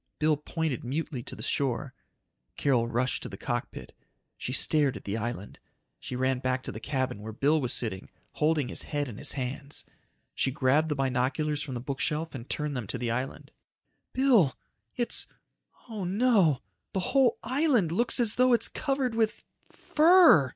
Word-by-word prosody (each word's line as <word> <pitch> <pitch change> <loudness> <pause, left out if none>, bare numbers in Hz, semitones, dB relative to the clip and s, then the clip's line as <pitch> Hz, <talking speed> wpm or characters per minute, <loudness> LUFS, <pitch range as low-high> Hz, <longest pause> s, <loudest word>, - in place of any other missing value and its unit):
Bill 155 0 +3
pointed 150 -1 -3
mutely 135 0 -3
to - - -7
the - - -9
shore. 135 0 -1 0.6
Carol 125 -5 +2
rushed 120 +2 0
to - - -6
the - - -8
cockpit. - - -5 0.4
She - - -5
stared 145 +1 +2
at - - -12
the 100 - -3
island. 115 -2 -5 0.4
She - - -6
ran 130 0 +1
back 130 0 -1
to - - -5
the - - -7
cabin 130 -6 -2
where 110 +1 -6
Bill 145 +7 +2
was 125 -2 -1
sitting, 110 -6 -2 0.2
holding 150 -3 +1
his - - -6
head 145 -1 -2
in 110 -5 -8
his - - 0
hands. 140 +2 -5 0.5
She - - 0
grabbed 140 +4 +2
the 150 - 0
binoculars 135 +3 0
from 135 -3 -5
the - - -3
bookshelf 150 +5 -2
and 125 -2 -8
turned 150 -1 -2
them 120 -5 -4
to 125 - -3
the 120 -1 -2
island. 130 +3 -4 0.6
"Bill! 240 - +3 0.4
It's... 240 - 0 0.6
oh 215 -4 -5
no! 190 - +3 0.3
The 190 - 0
whole 265 -4 +4
island 255 - +2
looks 235 +8 +2
as 230 -3 +4
though 255 0 +5
it's 235 - +4
covered 270 -4 -1
with... 225 -1 0 0.3
fur!" 315 - +6
145 Hz, 170 wpm, -28 LUFS, 125-195 Hz, 0.6 s, fur